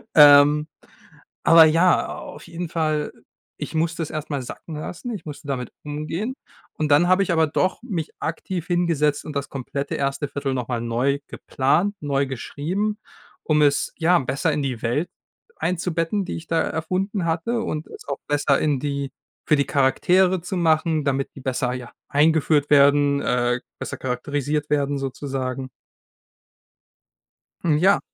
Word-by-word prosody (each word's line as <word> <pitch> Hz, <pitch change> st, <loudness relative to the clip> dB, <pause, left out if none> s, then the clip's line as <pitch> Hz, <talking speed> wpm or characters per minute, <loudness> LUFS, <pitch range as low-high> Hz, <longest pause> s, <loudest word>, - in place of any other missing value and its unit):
Ähm. 145 Hz, 0 st, +8 dB, 0.8 s
Aber 165 Hz, 0 st, +9 dB
ja, 165 Hz, +3 st, +3 dB
auf -, -, -10 dB
jeden 170 Hz, 0 st, -5 dB
Fall, 155 Hz, -3 st, -1 dB, 0.5 s
ich -, -, -6 dB
musste 165 Hz, +1 st, 0 dB
es 160 Hz, -, -3 dB
erst 155 Hz, 0 st, -5 dB
mal 140 Hz, -, -1 dB
sacken 155 Hz, +5 st, -8 dB
lassen. 180 Hz, +10 st, -6 dB
Ich 205 Hz, -, -7 dB
musste 150 Hz, -1 st, -8 dB
damit 130 Hz, -3 st, -3 dB
umgehen. 155 Hz, -, -4 dB, 0.4 s
Und 155 Hz, -1 st, -2 dB
dann 150 Hz, +4 st, +5 dB
habe 185 Hz, +2 st, +4 dB
ich 190 Hz, -, 0 dB
aber 160 Hz, -1 st, +4 dB
doch 185 Hz, +8 st, -1 dB
mich 180 Hz, -10 st, -3 dB
aktiv 170 Hz, +1 st, -4 dB
hingesetzt 170 Hz, -5 st, +1 dB
und 150 Hz, -2 st, -7 dB
das 140 Hz, 0 st, -2 dB
komplette 140 Hz, +1 st, -4 dB
erste 140 Hz, +1 st, -1 dB
1/4 140 Hz, -1 st, -3 dB
noch 125 Hz, -2 st, -3 dB
mal 120 Hz, -2 st, -1 dB
neu 125 Hz, +5 st, 0 dB
geplant, 170 Hz, +10 st, 0 dB
neu 140 Hz, -1 st, 0 dB
geschrieben, 175 Hz, -, -3 dB, 0.5 s
um 150 Hz, -1 st, +2 dB
es, 145 Hz, -1 st, +2 dB
ja, 175 Hz, +2 st, +4 dB
besser 145 Hz, +3 st, 0 dB
in 145 Hz, -1 st, -1 dB
die 125 Hz, -4 st, -3 dB
Welt 135 Hz, +9 st, 0 dB, 0.5 s
einzubetten, 175 Hz, +2 st, -1 dB
die -, -, -4 dB
ich 165 Hz, -, -8 dB
da 165 Hz, -1 st, +1 dB
erfunden 185 Hz, +4 st, -2 dB
hatte 175 Hz, +9 st, -1 dB
und 155 Hz, -7 st, -3 dB
es -, -, -12 dB
auch 140 Hz, -, -3 dB
besser 145 Hz, -1 st, +2 dB
in 145 Hz, -3 st, +1 dB
die 140 Hz, -1 st, -3 dB, 0.4 s
für 150 Hz, -, +5 dB
die 140 Hz, -1 st, +1 dB
Charaktere 180 Hz, +7 st, +3 dB
zu 180 Hz, +2 st, -4 dB
machen, 160 Hz, -2 st, +2 dB
damit 135 Hz, -1 st, 0 dB
die 135 Hz, -, -10 dB
besser, 125 Hz, -1 st, -1 dB
ja, 125 Hz, -1 st, -7 dB, 0.2 s
eingeführt 150 Hz, 0 st, +2 dB
werden, 140 Hz, 0 st, +5 dB
äh, 125 Hz, 0 st, +1 dB, 0.2 s
besser -, -, -5 dB
charakterisiert 145 Hz, +4 st, -2 dB
werden 145 Hz, -1 st, +1 dB
sozusagen. 135 Hz, -1 st, -4 dB, 1.9 s
Hm, 155 Hz, -3 st, +3 dB
ja. 195 Hz, +3 st, +5 dB
150 Hz, 160 wpm, -23 LUFS, 140-165 Hz, 1.9 s, Aber